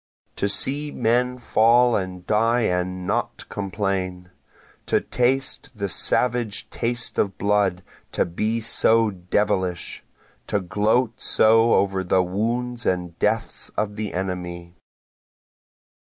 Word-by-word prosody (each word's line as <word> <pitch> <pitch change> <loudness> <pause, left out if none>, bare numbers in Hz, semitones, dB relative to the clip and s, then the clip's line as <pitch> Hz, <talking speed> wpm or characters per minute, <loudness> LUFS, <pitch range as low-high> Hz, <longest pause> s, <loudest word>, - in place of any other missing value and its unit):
To 100 - 0
see 145 +8 +1
men 125 0 0
fall 120 0 +3
and 90 -2 -4
die 115 +3 +2
and 90 -2 -1
not - - -2
complain! 95 -3 -3 0.6
To - - +3
taste 135 +3 0
the 100 -2 -3
savage 120 +2 +1
taste 120 0 -2
of 100 -2 0
blood 100 -3 +1 0.3
to - - +1
be 110 +7 -2
so 115 0 +3
devilish! 95 -1 -2 0.4
To 105 - 0
gloat 105 +6 0
so 115 +1 +4
over 95 -1 +1
the 95 0 +2
wounds 115 +6 -2
and 90 -2 -2
deaths - - -1
of 105 -1 -1
the 105 -3 -4
enemy. 90 -2 -5
105 Hz, 115 wpm, -23 LUFS, 95-115 Hz, 0.6 s, so